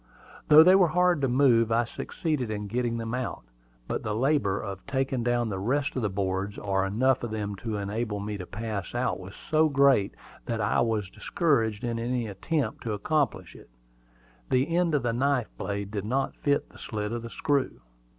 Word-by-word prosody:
Though 155 +1 +9
they 180 +3 +7
were 190 -2 +6
hard 180 -1 +2
to 135 - +2
move, 120 -3 +4
I 115 +1 +3
succeeded 130 +2 -3
in 105 -1 -3
getting 120 +2 -1
them 115 0 -4
out. 125 - -3 0.4
But - - -2
the 105 -1 -2
labor 120 -6 +1
of 100 -2 -6
taking 135 -2 -1
down 120 -1 +1
the 95 -2 -3
rest 140 +8 0
of 130 - -1
the 105 - 0
boards, 95 +1 -2
or 95 -1 0
enough 130 +6 +2
of 120 - -2
them 105 -2 -3
to 110 +1 -4
enable 105 +1 -3
me 105 +1 -4
to 90 - -7
pass 105 0 -5
out, 125 -4 0
was 95 +1 -10
so 155 0 +2
great 140 -8 +3 0.3
that 115 -1 -2
I 100 - +1
was 110 -5 -1
discouraged 125 - 0
in 120 -1 -1
the 120 +1 -1
attempt 135 - -2
to 110 - -1
accomplish 105 - -1
it. - - -15 0.8
The 135 +6 +1
end 175 -3 +2
of 140 - +1
the 120 -1 0
knife 130 -1 0
blade 100 0 -4
did 105 -2 -3
not 135 +4 0
fit 145 0 0
the - - -16
slit 105 -1 -4
of 120 0 -3
the 115 - -7
screw. 145 0 -1
115 Hz, 200 wpm, -27 LUFS, 105-140 Hz, 0.8 s, Though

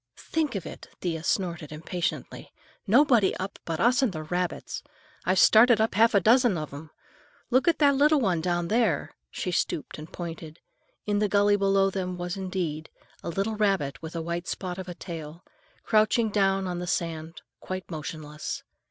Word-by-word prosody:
"Think 315 -6 -2
of 195 - -3
it," - - -9
Thea 165 -3 -2
snorted 170 -5 -1
impatiently. 165 +3 -4 0.4
"Nobody 240 -2 +4
up 190 +1 -5
but 165 -1 -3
us 245 +2 +4
and 260 -6 +2
the 155 -3 -5
rabbits! 175 +3 -3 0.4
I've 185 +1 +2
started 225 +2 +7
up 220 +1 +1
half 225 +3 +4
a - - +7
dozen 230 0 +4
of 155 -2 -5
'em. 155 +2 -9 0.6
Look 255 +5 +3
at 335 - +4
that 285 -2 +5
little 295 +2 +4
one 185 -9 +1
down 175 0 -1
there 220 -9 +1
now,"—she 180 - -6
stooped 155 -3 -2
and 155 +1 -10
pointed. 165 -2 -7 0.5
In 205 -1 +1
the 210 -1 +1
gully 205 0 +4
below 195 -1 +2
them 185 -1 -3
there - - -7
was, 175 0 -3
indeed, 180 -5 -3 0.3
a - - -5
little 195 +6 -1
rabbit 195 -10 0
with 160 +1 -8
a 165 - -2
white 170 +2 -4
spot 185 -1 -4
of 185 -1 -6
a 175 - -6
tail, 165 -1 -8 0.4
crouching 220 0 +3
down 195 -2 +2
on 180 -1 -3
the 180 - -5
sand, 165 -1 -3 0.2
quite 185 0 -6
motionless. 150 -1 -6
185 Hz, 180 wpm, -27 LUFS, 165-210 Hz, 0.6 s, started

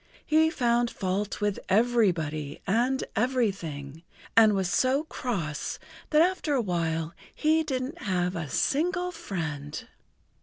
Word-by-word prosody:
He 315 +1 +4
found 240 -5 +1
fault 200 +1 -2
with 205 -1 0
everybody 180 -10 +1
and 245 +6 +1
everything, 190 - -1 0.3
and 220 -2 +7
was 190 -2 0
so 260 - +2
cross 195 - -3 0.3
that 305 +1 +5
after 355 -5 0
a - - +2
while 165 -4 -1 0.2
he 315 +1 +3
didn't 265 -2 -3
have 180 -5 0
a 160 -4 -4
single 360 - +1
friend. 160 - -5
215 Hz, 120 wpm, -27 LUFS, 170-265 Hz, 0.3 s, and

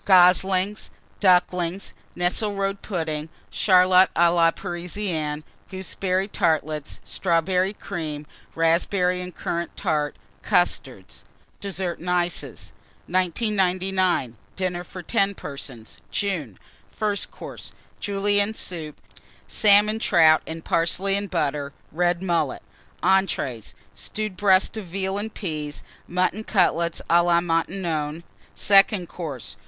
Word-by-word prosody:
Goslings. 185 +2 +4 0.3
Ducklings. 180 -1 +2 0.2
Nesselrode 195 +2 0
Pudding. 160 -5 -3 0.2
Charlotte 185 -1 +5
à 170 0 +4
la 165 -1 +5
Parisienne. 170 -4 -4 0.3
Gooseberry 190 0 -1
Tartlets. 155 -5 -1
Strawberry 180 +2 +1
Cream. 155 -7 -5 0.3
Raspberry 180 +2 +2
and 180 -1 -8
Currant 170 0 -4
Tart. 150 -2 0 0.3
Custards. - - 0 0.4
DESSERT 190 -3 -3
AND 180 - -5
ICES. 175 -1 -1 0.3
1999. 185 - 0 0.2
DINNER 180 -2 -2
FOR 180 0 -9
10 200 -2 +1
PERSONS 135 -7 -8
(June). 165 - -2 0.3
FIRST 205 -1 -2
COURSE. - - -10 0.3
Julienne 205 +1 0
Soup. 160 -7 -6 0.5
Salmon 210 +1 +4
Trout 165 -7 +5
and 160 0 -7
Parsley 185 +4 +1
and 200 0 -2
Butter. 145 -4 -1 0.2
Red 175 +2 0
Mullet. 170 -3 0 0.4
ENTREES. 170 - +1 0.2
Stewed 215 -3 -5
Breast 190 +1 +3
of 215 - -5
Veal 190 +2 -3
and 220 +2 -4
Peas. 155 -7 -5 0.2
Mutton 185 +4 0
Cutlets 170 -5 +1
à 170 +1 +5
la 170 -1 +4
Maintenon. 165 -2 -1 0.3
SECOND 195 -2 +4
COURSE. 150 -10 -7
180 Hz, 105 wpm, -24 LUFS, 165-195 Hz, 0.5 s, Charlotte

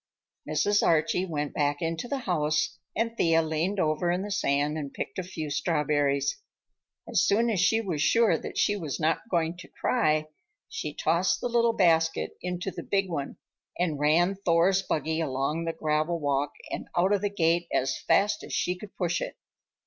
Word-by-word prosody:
Mrs. 165 +7 +2
Archie 170 +3 +2
went 150 -3 -3
back 145 -1 0
into 165 +6 -3
the 280 - -2
house 155 -1 0 0.2
and 230 +1 -1
Thea 165 -5 +3
leaned 160 +6 -1
over 155 +1 +1
in 180 +2 0
the 205 - -5
sand 145 -4 +1
and 145 -3 -4
picked 135 - -5
a - - -2
few 160 -5 -6
strawberries. 145 - 0 0.7
As - - +2
soon 230 +3 +3
as 200 - 0
she 220 +5 +3
was 175 -9 -3
sure 230 +9 +4
that - - -6
she 205 - +2
was 160 -8 -4
not 160 +7 0
going 170 -2 0
to 175 - -11
cry, 155 -9 +1 0.4
she 150 - -5
tossed 170 +4 +1
the 245 - -2
little 235 -1 +3
basket 165 -5 +2
into 180 +1 -3
the - - -7
big 195 -1 0
one 145 -5 -4 0.4
and 165 -5 -1
ran 165 +6 +3
Thor's 180 +3 +3
buggy 160 -2 -1
along 150 +3 -1
the 165 - 0
gravel 155 +2 0
walk 145 -1 0 0.2
and - - -4
out 185 +4 +3
of 200 - +1
the 205 - 0
gate 170 -3 +1
as 135 +1 0
fast 210 +1 +2
as - - -8
she 180 - 0
could 200 +2 -12
push 175 -2 -1
it. - - -5
165 Hz, 185 wpm, -27 LUFS, 155-190 Hz, 0.7 s, sure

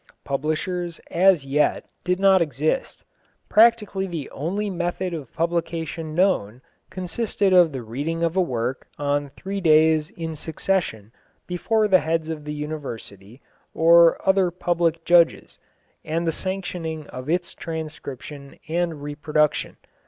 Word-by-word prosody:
Publishers 165 +5 -2
as 175 -4 +4
yet 145 +2 +1 0.2
did 180 +1 0
not 195 -1 +5
exist. 155 - -1 0.5
Practically 210 -3 +4
the 165 -6 -5
only 195 +9 -2
method 180 -1 -2
of 145 -7 -6
publication 165 -1 -2
known 130 - +1 0.3
consisted 190 +2 -1
of 175 -3 +6
the 130 -3 -5
reading 145 +9 -3
of 165 +1 0
a 190 - +4
work 125 -5 -2
on 145 0 -1
three 195 +7 -5
days 155 -1 +4
in 165 -6 -6
succession 155 - -2 0.3
before 215 +5 +1
the 190 -2 +5
heads 160 0 -1
of 155 -2 -5
the 150 - -4
University, 130 -7 -7 0.3
or 170 +1 +6
other 190 -1 +4
public 170 -2 -1
judges, 170 -1 +3 0.4
and 165 +2 -2
the 165 - +2
sanctioning 175 -4 -4
of 130 +3 -7
its 175 +1 -1
transcription 150 -3 -7
and 165 -2 -2
reproduction. 150 +1 0
165 Hz, 130 wpm, -23 LUFS, 150-180 Hz, 0.5 s, of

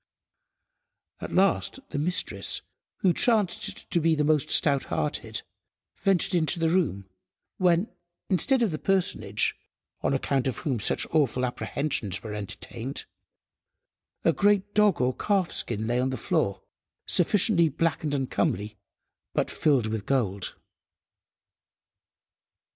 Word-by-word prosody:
At - - -6
last 195 +7 +2
the 145 - -2
mistress, 175 +5 -1 0.4
who 185 -3 +4
chanced 215 -5 0
to 170 - +2
be 160 0 +3
the 150 - +1
most 150 -2 +2
stout–hearted, 140 -5 0 0.5
ventured 195 -1 +1
into 170 0 +2
the 165 -1 +2
room 150 - 0 0.5
when, 180 +2 +3 0.4
instead 245 +7 +3
of 215 - +1
the 155 - -4
personage, 195 -2 +1 0.5
on - - +1
account 135 -1 0
of 130 - -2
whom 130 -6 -2
such 105 - +3
awful 130 -5 +2
apprehensions 125 -5 -2
were 110 -2 -6
entertained, 115 +5 -5 1.2
a 165 - +5
great 205 +1 +2
dog 210 -3 +4
or 125 0 +1
calf–skin 175 - -1
lay 120 +2 0
on 130 +1 +1
the 130 - -3
floor, 100 -2 -1 0.4
sufficiently 180 -2 +3
black 160 +2 -1
and 145 -2 -1
uncomely, 105 -6 -1 0.6
but - - 0
filled 140 -7 +2
with 110 -2 -4
gold. 100 -8 -1
150 Hz, 120 wpm, -27 LUFS, 125-185 Hz, 1.2 s, a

